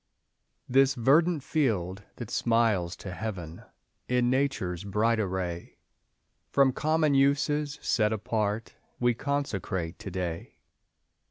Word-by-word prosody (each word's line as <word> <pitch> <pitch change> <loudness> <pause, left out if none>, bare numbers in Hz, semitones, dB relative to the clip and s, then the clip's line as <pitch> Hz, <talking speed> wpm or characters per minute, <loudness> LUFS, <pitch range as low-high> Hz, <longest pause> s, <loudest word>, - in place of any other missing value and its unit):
This 135 +1 +4
verdant 150 +5 +3
field 100 - 0
that 120 - -7
smiles 110 -7 +1
to 95 - -8
Heaven 90 -6 -6 0.5
In 125 0 +2
Nature's 130 -10 -1
bright 110 +3 +1
array, 90 -4 -3 0.7
From 135 -2 +4
common 155 0 +2
uses 145 +1 +2
set 105 -2 +2
apart, 110 0 -2 0.3
We 120 0 +3
consecrate 105 - -3
to - - -6
day. 90 -3 -5
115 Hz, 105 wpm, -28 LUFS, 95-135 Hz, 0.7 s, This